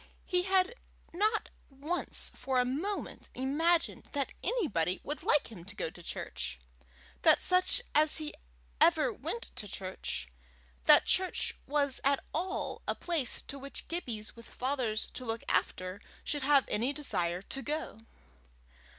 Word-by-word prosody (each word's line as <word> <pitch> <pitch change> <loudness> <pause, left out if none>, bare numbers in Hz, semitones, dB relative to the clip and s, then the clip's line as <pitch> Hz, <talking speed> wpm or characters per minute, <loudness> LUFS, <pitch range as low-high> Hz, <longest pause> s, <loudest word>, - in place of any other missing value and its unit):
He 360 -1 +2
had 380 +3 +3 0.4
not 430 +5 +1 0.2
once 295 +6 0
for 260 -1 0
a 250 - +3
moment 320 +11 -3
imagined 320 +6 +1
that 280 -2 -1
anybody 190 - +1
would 295 - -4
like 290 - +2
him 180 -6 -9
to 205 +1 -9
go 160 - -2
to 175 - -12
church, 65 - -4 0.6
that - - +7
such 365 +6 +3
as 305 0 +5
he 310 -1 -3 0.5
ever 325 -2 +5
went 470 - -4
to 210 - -3
church, 185 - -4 0.6
that - - +8
church 375 0 +1
was 280 -2 +2
at 275 0 +3
all 365 +5 -2
a - - +1
place 320 -8 +1
to 275 - -6
which 275 +1 -6
Gibbies 235 -11 -4
with 230 0 -13
fathers 250 -5 0
to 255 - -5
look 225 -1 -2
after 185 +2 0 0.2
should 290 - -2
have 280 0 +5
any 240 +6 +1
desire 180 - -1
to 270 - -4
go. 300 -6 -3
280 Hz, 145 wpm, -32 LUFS, 225-335 Hz, 0.6 s, that